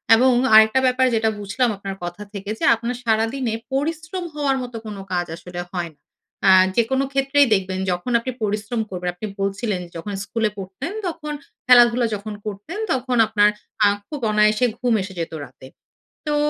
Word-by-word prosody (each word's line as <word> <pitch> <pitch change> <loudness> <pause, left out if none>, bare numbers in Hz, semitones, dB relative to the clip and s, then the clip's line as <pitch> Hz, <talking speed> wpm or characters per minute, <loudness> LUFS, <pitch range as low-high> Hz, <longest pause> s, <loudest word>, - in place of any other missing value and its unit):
এবং 255 +3 +4 0.2
আরেকটা 220 +3 +7
ব্যাপার 255 0 +3
যেটা 220 0 +2
বুঝলাম 220 +5 0
আপনার 195 0 -6
কথা 175 +3 -6
থেকে 200 0 -6
যে, - - -6
আপনার 235 +2 -4
সারাদিনে 225 +2 0 0.2
পরিশ্রম 320 +5 -2
হওয়ার 280 -2 +1
মতো 245 -2 -7
কোনো 205 -2 -6
কাজ 175 -1 0
আসলে 175 +1 -7
হয় 175 -2 -3
না। - - -46 0.4
অ্যা 190 - +7 0.2
যেকোন 260 +3 +2
ক্ষেত্রেই 275 +1 +3
দেখবেন 190 -1 0
যখন 180 +8 -3
আপনি 255 +2 -4
পরিশ্রম 215 +2 -1
করবেন, 180 -1 -3
আপনি 215 +4 -5
বলছিলেন, 195 -1 -1
"যখন 185 +5 -5
স্কুলে 220 +1 -1
পড়তেন, 195 - -6 0.2
তখন 315 -3 -5 0.3
খেলাধুলা 240 -1 +6
যখন 210 +1 -6
করতেন, 210 - -6
তখন 255 -1 0
আপনার 210 -1 +4 0.4
আ - - +7 0.2
খুব 295 - -6
অনায়াসে 215 +3 +3
ঘুম 245 -2 +1
এসে 190 0 -6
যেত 165 -1 -4
রাতে।" 130 0 -13 0.6
তো 300 - 0
220 Hz, 165 wpm, -22 LUFS, 195-255 Hz, 0.6 s, আরেকটা